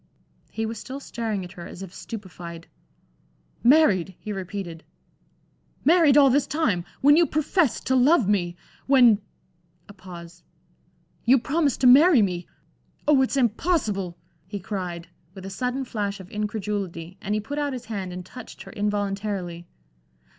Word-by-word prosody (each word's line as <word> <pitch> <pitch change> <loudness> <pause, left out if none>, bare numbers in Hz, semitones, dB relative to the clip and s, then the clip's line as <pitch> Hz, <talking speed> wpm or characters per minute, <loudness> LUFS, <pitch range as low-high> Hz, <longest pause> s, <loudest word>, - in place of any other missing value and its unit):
He 225 - -3
was 225 -1 -5
still 265 +5 -7
staring 225 -7 -4
at 175 - -11
her 175 -2 -9
as 190 - -9
if 190 -2 -10
stupefied. 175 -5 -8 1.0
"Married!" 210 - +4
he 210 - -5
repeated, 185 -3 -6 1.0
"married 315 -2 +6
all 275 -2 +7
this 280 +1 +2
time! 240 - 0 0.2
when 290 +2 +7
you 335 0 +4
professed 310 - 0
to 260 - +2
love 260 - +4
me! 175 -4 +1 0.3
When" 245 -6 +6 0.7
a 200 - -12
pause 175 -3 -11 0.8
"you 255 +3 +5
promised 280 +3 0
to - - +3
marry 275 - +7
me! 180 -2 -2 0.6
Oh, 290 -3 +5
it's 265 +1 0
impossible," 220 - 0 0.3
he 205 +1 -5
cried, 180 -3 -5 0.3
with 190 -1 -9
a 195 - -6
sudden 250 +5 -2
flash 205 -4 -3
of 190 -1 -12
incredulity, 200 -4 -4
and 210 0 -1
he - - +1
put 285 +8 -5
out 290 -2 -1
his 250 -1 -6
hand 195 -5 -4
and 180 0 -7
touched 250 -2 -11
her - - -11
involuntarily. 200 -4 -3
210 Hz, 150 wpm, -25 LUFS, 185-265 Hz, 1.0 s, all